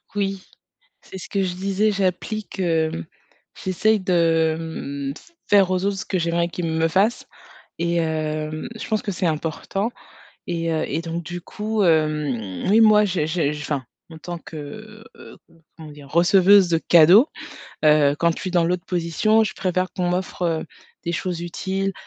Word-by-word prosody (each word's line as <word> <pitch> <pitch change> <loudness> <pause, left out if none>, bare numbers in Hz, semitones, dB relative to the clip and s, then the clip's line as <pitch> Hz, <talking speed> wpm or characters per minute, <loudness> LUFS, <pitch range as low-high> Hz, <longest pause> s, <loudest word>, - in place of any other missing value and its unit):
Oui. 195 -2 -2 0.6
C'est 190 - -10
ce 180 - -9
que 195 - 0
je 180 -2 -2
disais, 195 +3 0
j'applique, 195 +1 -2
hem 160 - 0 0.6
j'essaie 215 +4 +2
de, 165 -4 +2
hem, 140 -4 -5
f - - -16 0.2
faire 195 -2 +5
aux 185 0 0
autres 200 0 0
ce - - -4
que 190 - -2
j'aimerais 170 0 0
qu'ils 175 0 -4
me 160 0 +1
fassent 195 +8 +1 0.5
et 170 0 0
hem, 155 -1 -2
je - - -7
pense 215 -1 0
que 205 - -3
c'est 185 0 -2
important. 165 +7 -2 0.6
Et 165 -1 -2
heu 160 0 0
et 160 +3 -2
donc 170 0 -4
du 175 +2 -6
coup, 215 +4 -3
hem, 150 - 0
oui 215 +3 +5
moi 215 -1 +6
j'ai 180 -6 -1
j'ai 160 -3 0
je 150 - -6
enfin, 145 -3 -3 0.3
en 160 - -10
tant 175 +1 -6
que, 210 +9 -10
heu, - - -13 0.4
comment 160 -2 -10
dire, 145 -1 -13
receveuse 185 +4 +5
de 165 -1 +2
cadeaux, 175 - +6 0.6
heu, 150 -2 +5
quand 170 0 +3
je - - -8
suis 185 - -4
dans 175 -2 +3
l'autre 175 0 -1
position, 180 +6 +2
je 195 - -4
préfère 185 0 -1
qu'on 180 -1 -1
m'offre, 180 0 -3
heu, 165 -2 0 0.4
des 170 - -1
choses 175 0 -3
utiles, 190 +3 -3
175 Hz, 175 wpm, -22 LUFS, 160-195 Hz, 0.6 s, moi